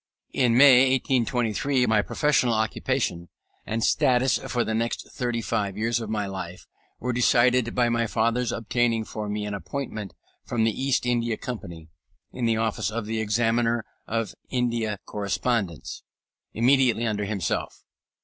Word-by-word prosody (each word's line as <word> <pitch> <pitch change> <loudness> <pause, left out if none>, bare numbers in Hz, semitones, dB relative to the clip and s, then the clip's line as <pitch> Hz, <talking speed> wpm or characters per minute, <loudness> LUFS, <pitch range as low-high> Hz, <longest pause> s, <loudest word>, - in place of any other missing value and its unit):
In 120 -3 +3
May, 130 -1 +7
1823, 125 0 +1
my 110 -2 +3
professional 130 -2 +1
occupation 110 - -1 0.4
and 110 +1 -1
status 125 0 +3
for 120 -1 -1
the 110 - -2
next 115 +1 -2
thirty 120 -2 -2
five 105 -4 -2
years 115 +2 0
of 110 - -5
my 105 -2 -1
life, 95 -2 -7 0.3
were 125 +1 -2
decided 125 0 +3
by 120 -1 +3
my 115 -1 +1
father's 115 +3 0
obtaining 115 0 0
for 105 -1 -5
me 105 0 -2
an 105 - -4
appointment 100 - -5 0.3
from 115 -2 -1
the 110 - +3
East 130 +1 0
India 120 -2 0
Company, 85 -10 -7 0.4
in 125 - -3
the 115 -1 +2
office 110 -3 -1
of 110 0 -4
the 110 +1 -2
Examiner 115 +2 +1 0.2
of 115 -3 -2 0.2
India 115 -4 -1
Correspondence, 100 - -2 0.5
immediately 120 0 +3
under 105 -2 -1
himself. 100 -4 -3
115 Hz, 145 wpm, -25 LUFS, 105-125 Hz, 0.5 s, May